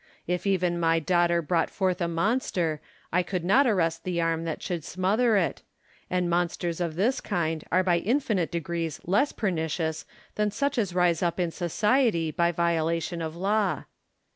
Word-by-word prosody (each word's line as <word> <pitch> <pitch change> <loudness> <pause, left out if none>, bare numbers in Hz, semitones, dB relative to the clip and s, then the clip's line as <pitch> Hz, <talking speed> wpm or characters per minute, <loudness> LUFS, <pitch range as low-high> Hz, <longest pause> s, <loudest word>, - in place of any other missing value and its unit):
If 180 +2 -2
even 180 -3 +1
my 165 -1 +3
daughter 170 +1 +2
brought 165 +2 +1
forth 185 -2 -1
a 170 - +1
monster, 170 -3 0 0.3
I 180 - +4
could 180 -1 -3
not 260 +9 +5
arrest 165 -7 +1
the 180 -2 -2
arm 165 0 0
that 165 - -4
should 175 -4 -3
smother 210 +7 +2
it: 180 - 0 0.5
and 180 -1 0
monsters 175 0 -1
of 165 -3 -2
this 220 +9 +1
kind 165 -5 -2
are 185 +2 +3
by 175 -2 +2
infinite 215 - 0
degrees 170 -2 -3
less 205 - +2
pernicious 160 -5 -2 0.3
than 210 0 0
such 280 +4 -1
as 190 -5 -1
rise 175 -2 +2
up 175 0 0
in 175 -2 0
society 190 - +1
by 170 +2 +2
violation 170 0 0
of 160 0 -4
law. 200 +3 0
175 Hz, 165 wpm, -27 LUFS, 165-195 Hz, 0.5 s, not